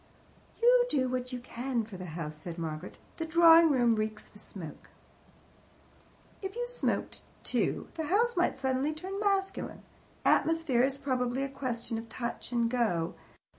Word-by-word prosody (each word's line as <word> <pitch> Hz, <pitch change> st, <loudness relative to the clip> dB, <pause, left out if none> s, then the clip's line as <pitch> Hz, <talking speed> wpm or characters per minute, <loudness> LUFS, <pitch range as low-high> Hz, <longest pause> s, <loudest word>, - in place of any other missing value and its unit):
"You 485 Hz, +1 st, +6 dB
do 260 Hz, -, +2 dB
what 250 Hz, 0 st, -2 dB
you 250 Hz, -, -3 dB
can 245 Hz, 0 st, -2 dB
for 215 Hz, -2 st, -10 dB
the 185 Hz, 0 st, -7 dB
house," 155 Hz, -2 st, -4 dB
said 165 Hz, +2 st, -7 dB
Margaret. 160 Hz, +1 st, -5 dB, 0.2 s
"The 325 Hz, -, -2 dB
drawing 330 Hz, 0 st, +7 dB
room 245 Hz, -5 st, +4 dB
reeks 215 Hz, 0 st, -3 dB
of -, -, -14 dB
smoke." 165 Hz, -6 st, -10 dB, 1.5 s
"If 385 Hz, +1 st, -5 dB
you 485 Hz, 0 st, -1 dB
smoked -, -, -2 dB, 0.2 s
too, -, -, 0 dB
the 320 Hz, -2 st, -3 dB
house 460 Hz, +6 st, +2 dB
might 350 Hz, -, +2 dB
suddenly 265 Hz, +3 st, 0 dB
turn 380 Hz, +5 st, -5 dB
masculine. 395 Hz, -2 st, -1 dB, 0.4 s
Atmosphere 325 Hz, -7 st, +3 dB
is 270 Hz, +1 st, +2 dB
probably 255 Hz, -1 st, -1 dB
a 275 Hz, -, -2 dB
question 245 Hz, -4 st, -3 dB
of 225 Hz, 0 st, -10 dB
touch 235 Hz, +1 st, -5 dB
and 235 Hz, -1 st, +2 dB
go. 220 Hz, -9 st, 0 dB
255 Hz, 155 wpm, -30 LUFS, 230-330 Hz, 1.5 s, drawing